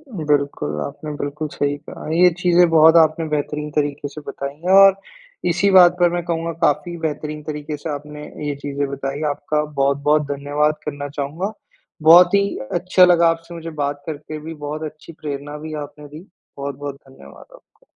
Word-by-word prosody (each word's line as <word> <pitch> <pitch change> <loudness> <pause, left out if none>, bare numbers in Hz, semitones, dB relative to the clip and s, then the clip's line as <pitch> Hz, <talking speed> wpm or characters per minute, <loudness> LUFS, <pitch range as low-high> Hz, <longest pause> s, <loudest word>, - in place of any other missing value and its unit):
बिल्कुल, 140 - -1
आपने 150 - -6
बिल्कुल 145 +2 -4
सही 145 0 -1
कहा, 145 - -10
ये 180 +1 +6
चीज़ें 175 -1 +4
बहुत 160 0 +6
आपने 160 0 +3
बेहतरीन 150 0 -2
तरीके 145 -1 -1
से 150 +2 -10
बताई 140 0 -5
हैं 185 - +2
और 195 -1 +8 0.5
इसी 185 +4 +2
बात 180 -2 +7
पर 175 0 +5
मैं 175 0 -1
कहूँगा 165 -1 -2
काफ़ी 175 +1 +1
बेहतरीन 150 -1 -4
तरीके 150 0 -5
से 155 - -6
आपने 150 0 -7 0.2
ये 145 - -2
चीज़ें 140 0 -2
बताई, 140 +1 -4
आपका 150 +1 -1 0.2
बहुत-बहुत 140 +2 +2
धन्यवाद 145 +2 0
करना 145 -1 -4
चाहूँगा, 150 +8 -4 0.5
बहुत 175 +5 +8
ही 200 0 +3 0.2
अच्छा 180 +1 +4
लगा 170 -1 +5
आपसे 165 +1 -4
मुझे 165 0 -7
बात 145 0 -3
करके, 155 0 -6
भी 160 +2 -7
बहुत 150 0 -6
अच्छी 155 +2 -14
प्रेरणा 145 0 -5
भी 155 +1 -7
आपने 150 0 -12
दी, 155 +5 -12 0.3
बहुत-बहुत 140 0 -5
धन्यवाद 135 - -15
आपको। - - -25
150 Hz, 170 wpm, -20 LUFS, 145-165 Hz, 0.5 s, और